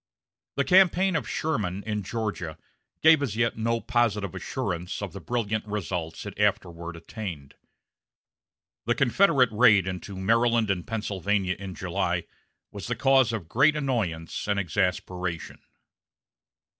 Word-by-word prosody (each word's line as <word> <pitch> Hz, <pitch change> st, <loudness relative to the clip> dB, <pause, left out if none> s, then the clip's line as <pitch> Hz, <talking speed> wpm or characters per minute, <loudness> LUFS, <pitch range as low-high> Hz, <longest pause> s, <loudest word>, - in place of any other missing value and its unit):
The -, -, +2 dB
campaign 190 Hz, 0 st, +4 dB
of 155 Hz, -, -2 dB
Sherman 100 Hz, -, -2 dB
in 105 Hz, -1 st, -2 dB
Georgia 100 Hz, -6 st, -4 dB, 0.5 s
gave 160 Hz, -1 st, +7 dB
as 125 Hz, -7 st, -2 dB
yet 115 Hz, 0 st, +1 dB
no 115 Hz, +1 st, 0 dB
positive 105 Hz, -6 st, 0 dB
assurance 90 Hz, +1 st, -4 dB
of 100 Hz, -3 st, -5 dB
the 100 Hz, -, -8 dB
brilliant 110 Hz, 0 st, -1 dB
results 90 Hz, -5 st, -4 dB
it -, -, -8 dB
afterward 85 Hz, -1 st, -1 dB
attained. 85 Hz, -5 st, -7 dB, 1.3 s
The 120 Hz, -, +2 dB
Confederate 135 Hz, -, +4 dB
raid 105 Hz, -4 st, +5 dB
into 95 Hz, +1 st, -5 dB
Maryland 115 Hz, +2 st, +2 dB
and 90 Hz, +1 st, -3 dB
Pennsylvania 100 Hz, -4 st, -1 dB
in 95 Hz, -2 st, -7 dB
July -, -, -1 dB, 0.5 s
was 100 Hz, -2 st, -7 dB
the 120 Hz, -, -1 dB
cause 130 Hz, 0 st, +4 dB
of 105 Hz, -8 st, -4 dB
great 145 Hz, -, +4 dB
annoyance 110 Hz, -, -2 dB
and 100 Hz, -1 st, +1 dB
exasperation. 90 Hz, -1 st, -2 dB
105 Hz, 130 wpm, -26 LUFS, 90-120 Hz, 1.3 s, gave